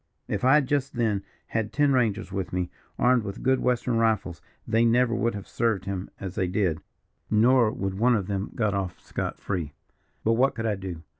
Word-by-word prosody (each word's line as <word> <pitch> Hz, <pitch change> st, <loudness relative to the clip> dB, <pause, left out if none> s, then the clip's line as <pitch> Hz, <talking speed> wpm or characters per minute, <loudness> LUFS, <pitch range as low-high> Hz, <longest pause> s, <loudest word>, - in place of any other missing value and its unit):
If -, -, -2 dB
I 130 Hz, +3 st, +6 dB
had 150 Hz, -2 st, +4 dB
just 135 Hz, 0 st, -1 dB
then 110 Hz, -5 st, 0 dB, 0.3 s
had 110 Hz, -2 st, -1 dB
ten 145 Hz, -1 st, +3 dB
rangers 115 Hz, -6 st, +1 dB
with 95 Hz, -2 st, -3 dB
me, 90 Hz, -1 st, -2 dB, 0.3 s
armed 125 Hz, -1 st, +4 dB
with 100 Hz, -1 st, -6 dB
good 130 Hz, 0 st, +3 dB
western 125 Hz, -1 st, +1 dB
rifles, 110 Hz, -7 st, 0 dB, 0.3 s
they 115 Hz, +1 st, +3 dB
never 120 Hz, +1 st, +3 dB
would 115 Hz, -1 st, 0 dB
have 100 Hz, -, -7 dB
served 115 Hz, -5 st, 0 dB
him 95 Hz, -1 st, -4 dB
as 95 Hz, -2 st, -5 dB
they 95 Hz, -, 0 dB
did, 90 Hz, -4 st, 0 dB, 0.5 s
nor 120 Hz, +2 st, +5 dB
would 95 Hz, -2 st, -3 dB
one 120 Hz, +2 st, +4 dB
of 100 Hz, -4 st, -1 dB
them 100 Hz, 0 st, -3 dB
got 110 Hz, -3 st, +1 dB
off 95 Hz, -2 st, -3 dB
scot -, -, -4 dB
free. 85 Hz, -7 st, -3 dB, 0.5 s
But 115 Hz, -, +3 dB
what 130 Hz, +4 st, +2 dB
could 110 Hz, -, -3 dB
I 110 Hz, -, +1 dB
do? 95 Hz, -4 st, -6 dB
110 Hz, 205 wpm, -26 LUFS, 95-120 Hz, 0.5 s, I